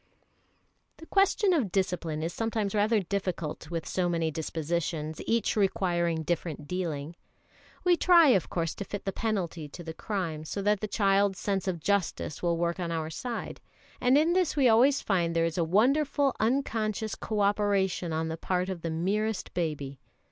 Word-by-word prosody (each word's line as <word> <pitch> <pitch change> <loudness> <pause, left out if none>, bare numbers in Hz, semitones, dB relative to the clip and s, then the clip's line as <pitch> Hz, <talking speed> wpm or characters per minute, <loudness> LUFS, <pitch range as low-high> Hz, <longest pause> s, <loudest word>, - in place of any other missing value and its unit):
The 325 - -12
question 390 +2 +3
of 250 - +1
discipline 170 -5 -1
is 165 - -2
sometimes 220 -3 -1
rather 210 +1 +2
difficult 180 -5 -3
with 165 -2 -4
so 180 -1 0
many 165 -2 0
dispositions, 160 0 -3
each 230 0 +1
requiring 175 -5 +1
different 155 -3 -3
dealing. 165 -3 -3 0.7
We 360 -1 +5
try, 340 -3 +6
of 195 -8 +3
course, 165 -2 -1
to - - -5
fit 205 0 -6
the 195 - 0
penalty 180 -9 -3
to 175 - -9
the 160 -1 -6
crime, 170 -5 -3
so 155 - -5
that 210 0 +2
the 215 - -2
child's 200 -2 +2
sense 195 -1 -2
of 180 -3 -1
justice 195 -3 -1
will 170 -1 +1
work 170 +1 -1
on 170 -2 -2
our 160 -1 -2
side; 240 +8 -5 0.4
and 255 +3 +5
in 320 +3 +3
this 360 -4 +1
we 275 -4 +4
always 255 +5 +5
find 170 -4 +1
there 165 0 +3
is 165 +1 -2
a - - +3
wonderful 270 - +2
unconscious 220 -3 0
co 215 -2 -2
operation 200 -3 +1
on 160 0 -1
the 160 0 -4
part 180 +2 -1
of 185 -3 -4
the 165 - -3
merest 195 +5 -1
baby. 145 -5 -3
185 Hz, 175 wpm, -28 LUFS, 165-215 Hz, 0.7 s, try